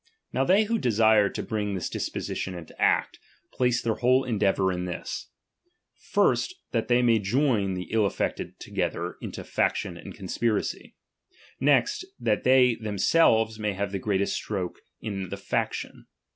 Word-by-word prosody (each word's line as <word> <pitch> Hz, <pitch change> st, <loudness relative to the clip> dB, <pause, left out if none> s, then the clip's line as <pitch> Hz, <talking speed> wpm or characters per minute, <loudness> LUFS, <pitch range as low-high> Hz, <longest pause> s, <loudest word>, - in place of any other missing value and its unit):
Now 130 Hz, -, +2 dB
they 190 Hz, +9 st, +4 dB
who 225 Hz, +1 st, 0 dB
desire 110 Hz, -, +4 dB
to -, -, -5 dB
bring 105 Hz, -3 st, -2 dB
this 90 Hz, -, -2 dB
disposition 95 Hz, -, -4 dB
into 85 Hz, -2 st, -10 dB
act, -, -, +2 dB, 0.3 s
place 125 Hz, -2 st, +1 dB
their 115 Hz, -, +1 dB
whole 130 Hz, +3 st, +3 dB
endeavour 100 Hz, -5 st, +1 dB
in 90 Hz, 0 st, -3 dB
this: 90 Hz, -1 st, -5 dB, 0.7 s
first, 370 Hz, -, +1 dB, 0.2 s
that 115 Hz, -2 st, -1 dB
they 125 Hz, 0 st, +3 dB
may 115 Hz, -2 st, +4 dB
join 105 Hz, -2 st, +1 dB
the 90 Hz, -, -3 dB
ill 110 Hz, -2 st, +3 dB
affected -, -, -3 dB
together -, -, -3 dB
into -, -, -6 dB
/action -, -, -1 dB
and -, -, -9 dB
conspiracy; 115 Hz, -3 st, -2 dB, 0.6 s
next, 135 Hz, -, +2 dB, 0.2 s
that 105 Hz, -2 st, 0 dB
themselves 110 Hz, -, +3 dB
may 105 Hz, -1 st, -1 dB
have 100 Hz, 0 st, -3 dB
the 100 Hz, -, -2 dB
greatest 100 Hz, 0 st, 0 dB
stroke 95 Hz, -4 st, -3 dB, 0.2 s
in 95 Hz, -4 st, -4 dB
t\i& -, -, -4 dB
faction. -, -, -3 dB
110 Hz, 145 wpm, -26 LUFS, 100-125 Hz, 0.7 s, they